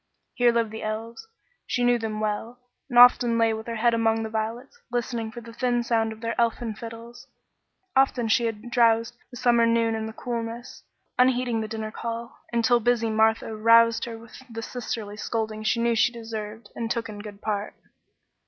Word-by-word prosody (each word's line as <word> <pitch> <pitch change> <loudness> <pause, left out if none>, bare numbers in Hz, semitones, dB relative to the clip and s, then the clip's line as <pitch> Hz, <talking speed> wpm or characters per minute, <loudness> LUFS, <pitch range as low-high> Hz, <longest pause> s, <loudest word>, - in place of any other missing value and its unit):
Here 245 -2 +4
lived 230 -2 0
the 220 - -7
elves; 225 - -5 0.4
she 245 - 0
knew 245 0 +3
them 220 -1 -3
well, 215 +3 -3 0.3
and 245 - -1
often 245 -1 +7
lay 225 -1 +3
with 220 +1 -6
her 230 - -3
head 235 +1 +2
among 225 -1 +1
the 220 - -5
violets, 230 - -4
listening 235 -2 -2
for 240 - -8
the 230 0 -11
thin 240 0 0
sound 225 -2 +1
of 220 0 -10
their 230 0 -2
elfin 230 -1 0
fiddles. 230 +2 -10 0.7
Often 265 -3 +3
she 235 +2 +3
had 225 +2 -6
drowsed 230 -1 +3 0.2
the 245 - -10
summer 235 -1 +4
noon 230 -1 +2
in 220 0 -3
the 220 - -7
coolness, 235 0 -5 0.4
unheeding 250 -2 +3
the 220 - -3
dinner 220 0 -5
call, 230 +1 -6
until 235 +1 +3
busy 230 -1 +1
Martha 220 0 +2
roused 230 +1 +5
her 230 -1 -7
with 230 +3 -13
the 225 0 -5
sisterly 220 -4 -5
scolding 220 -1 -3
she 215 +2 +1
knew 235 0 +2
she 240 +2 +3
deserved 225 -1 -7
and 230 -1 -3
took 230 -1 -2
in 210 -2 -8
good 205 -1 -9
part. 205 -1 -3
230 Hz, 190 wpm, -25 LUFS, 220-240 Hz, 0.7 s, often